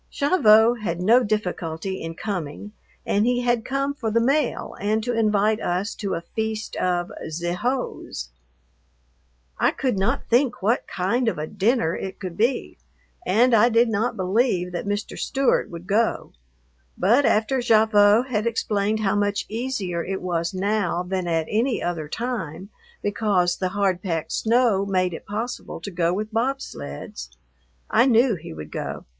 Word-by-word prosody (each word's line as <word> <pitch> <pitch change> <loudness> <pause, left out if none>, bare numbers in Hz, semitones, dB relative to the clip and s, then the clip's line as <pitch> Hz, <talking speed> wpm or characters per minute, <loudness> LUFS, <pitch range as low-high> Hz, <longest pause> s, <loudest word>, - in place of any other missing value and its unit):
Gavotte 235 -7 +4
had 175 -4 -2
no 230 +7 +5
difficulty 190 -4 -3
in 165 0 -5
coming, 195 0 -5 0.3
and 205 - +2
he 245 0 +2
had 240 -2 +1
come 275 +2 -1
for 230 -6 -3
the 225 +2 +2
mail 275 +6 0
and 215 +2 0
to 245 +1 -1
invite 215 -1 +2
us 185 +4 -1
to 200 -2 -3
a - - -4
feast 220 +3 -4
of 175 -1 0 0.2
"ze 170 +2 -3
hose." 240 - -3 1.3
I - - +4
could 250 -7 -1
not 235 +8 0
think 245 -3 +2
what 225 +5 +1
kind 230 +7 0
of 225 - 0
a 150 - -3
dinner 205 -1 +1
it 190 -1 -6
could 185 -3 -6
be, 240 +4 -1 0.5
and 235 +6 +4
I 230 +2 +6
did 230 0 +3
not 220 +2 -1
believe 185 -1 +1
that 175 +3 -4
Mr. 205 0 -3
Stewart 270 -1 +1
would 170 0 -9
go, 220 +5 0 0.7
but 240 +8 +4
after 235 +2 +2
Gavotte 220 0 +4
had 220 -3 -1
explained 215 -1 0
how 200 -1 +1
much 205 0 0
easier 210 -7 -2
it 190 0 -4
was 170 -2 -1
now 195 -2 0
than 185 -1 -3
at 165 -2 0
any 230 +3 0
other 165 -4 -3
time 200 -6 -4 0.3
because 200 -4 +1
the 185 - -1
hard 195 -2 0
packed 165 -5 -3
snow 230 -3 +2
made 185 -2 0
it - - -9
possible 225 +5 -4
to 200 - -6
go 170 -1 +1
with 210 +4 -3
bobsleds, 220 - -4 0.6
I 250 - +4
knew 240 0 +4
he 175 - -7
would 75 -1 -9
go. - - -5
210 Hz, 160 wpm, -23 LUFS, 180-235 Hz, 1.3 s, I